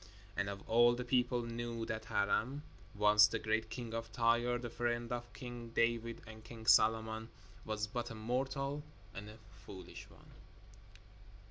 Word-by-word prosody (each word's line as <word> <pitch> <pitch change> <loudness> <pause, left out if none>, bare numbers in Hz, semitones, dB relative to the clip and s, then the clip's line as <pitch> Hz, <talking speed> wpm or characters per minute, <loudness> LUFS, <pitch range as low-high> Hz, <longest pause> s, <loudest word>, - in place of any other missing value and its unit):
And 100 - 0 0.2
all 120 +1 +5
the 125 - -3
people 125 -1 +2
knew 115 0 -4
that 110 -1 -4
Hiram, 125 +9 0 0.3
once 105 0 +7
the - - -2
great 110 0 0
king 115 0 -6
of 115 0 -4
Tyre, 120 +2 +2
the 120 -1 -6
friend 120 0 -1
of 120 0 -4
King 120 -2 -7
David 115 0 +1
and 110 0 -11
King 115 -1 -10
Solomon, 110 0 +4 0.4
was 110 -1 -1
but 120 +2 -4
a 115 - -7
mortal 135 +5 -2 0.3
and 105 +2 -7
a 110 - -11 0.3
foolish 95 -2 -10
one. - - -18
115 Hz, 150 wpm, -36 LUFS, 110-120 Hz, 0.4 s, once